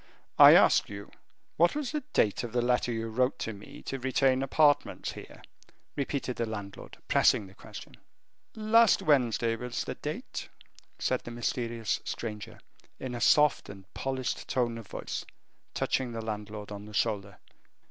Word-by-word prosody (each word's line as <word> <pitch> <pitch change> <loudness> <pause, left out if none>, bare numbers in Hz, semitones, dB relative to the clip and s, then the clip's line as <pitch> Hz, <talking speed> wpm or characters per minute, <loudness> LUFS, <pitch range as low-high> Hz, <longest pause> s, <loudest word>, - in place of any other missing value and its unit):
"I - - +11
ask - - +5
you 100 0 -9 0.5
what 170 - +4
was 295 -4 -2
the 300 0 -2
date 105 +2 +2
of 120 -2 -6
the 120 - +2
letter 125 0 +1
you 115 0 -3
wrote 125 +3 +1
to 115 - -4
me 100 0 -12
to 135 - -4
retain 130 0 +2
apartments 145 +1 +2
here?" - - -12 0.5
repeated 140 -2 -3
the 115 - -1
landlord, 100 -3 -8
pressing 105 - +3
the 95 - -14
question. - - -11 0.6
"Last 220 -1 +4
Wednesday 120 - +2
was 125 +1 -4
the - - -4
date," - - -6 0.5
said 130 - 0
the - - -9
mysterious 120 -1 -2
stranger, 110 -1 -6 0.4
in 130 -2 -5
a 120 - -5
soft 150 +1 +4
and 95 -1 -10
polished 130 -1 -3
tone 120 -2 0
of 110 - -11
voice, - - -5 0.5
touching 125 -2 -1
the 115 -1 -5
landlord 105 -1 -6
on 100 0 -7
the 105 0 -10
shoulder. 100 -3 -1
120 Hz, 160 wpm, -29 LUFS, 110-130 Hz, 0.6 s, I